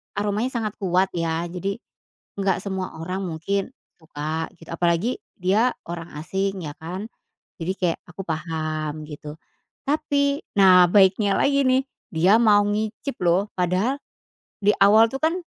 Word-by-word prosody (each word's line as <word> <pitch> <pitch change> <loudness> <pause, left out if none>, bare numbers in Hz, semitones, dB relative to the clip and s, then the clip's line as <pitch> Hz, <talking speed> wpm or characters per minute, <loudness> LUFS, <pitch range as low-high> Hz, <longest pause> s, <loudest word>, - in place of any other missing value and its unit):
aromanya 210 +3 0
sangat 215 -3 -3
kuat 185 -1 +1
ya 165 -1 -1
jadi, 195 +3 -3 0.6
nggak 195 -1 +1
semua 190 -4 -5
orang 185 +3 -3
mungkin 190 +7 -2 0.3
suka 155 +1 -4
git 165 - -15
apalagi 170 +7 0 0.2
dia 210 +7 +3 0.2
orang 170 -1 -6
asing 195 +4 -2
ya 150 - -4
kan, 185 +6 -6 0.5
jadi 165 +3 -1
kayak 175 -3 -1
aku 185 +2 -8
paham 155 -1 -3
gitu, 150 0 -8 0.5
tapi 285 -1 +1 0.2
nah 185 -2 +7
baiknya 200 0 +4
lagi 280 0 +3
nih 260 +1 +3 0.3
dia 180 +5 +4
mau 205 -3 +5
ngicip 215 +5 -3
loh 175 +4 +3
padahal, 185 +10 +1 0.7
di 205 - +6
awal 215 +3 +7
tuh 270 - -4
kan 320 +2 +3
190 Hz, 140 wpm, -23 LUFS, 165-210 Hz, 0.7 s, nah